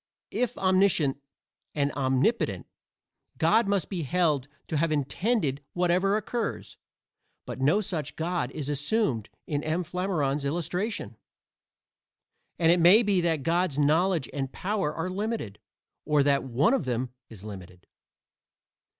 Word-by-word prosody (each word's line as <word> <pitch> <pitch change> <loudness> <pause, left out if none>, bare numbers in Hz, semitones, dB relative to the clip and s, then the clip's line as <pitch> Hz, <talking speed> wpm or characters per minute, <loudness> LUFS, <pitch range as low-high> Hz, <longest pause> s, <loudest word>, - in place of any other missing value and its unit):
If 250 -3 -1
omniscient 185 -7 +3 0.6
and 140 -1 +1
omnipotent, 135 - 0 0.7
God 225 0 +3
must 200 -6 +1
be 185 -4 -3
held 150 -3 +1 0.2
to 155 - -2
have 165 +2 +1
intended 145 - 0
whatever 180 +3 +2
occurs, 220 0 -4 0.7
but 130 - -6
no 155 +10 +3
such 160 -7 -4
God 170 -4 -1
is 140 0 -5
assumed 145 - 0 0.2
in 145 -1 -2
M. 160 +3 -1
Flammarion's 160 -6 -1
illustration, 170 - -3 1.4
and 165 0 +4
it 175 - +4
may 185 +7 +7
be 200 -4 +2
that 165 -4 0
God's 170 -1 +1
knowledge 155 0 +2
and 135 -2 -3
power 190 -5 -1
are 165 +3 -3
limited, 200 - -3 0.4
or 150 -1 +3
that 140 -1 +2
one 135 - +2
of 265 - 0
them 125 0 -2 0.2
is 105 -4 -12
limited. 95 -4 -10
160 Hz, 130 wpm, -27 LUFS, 140-190 Hz, 1.4 s, may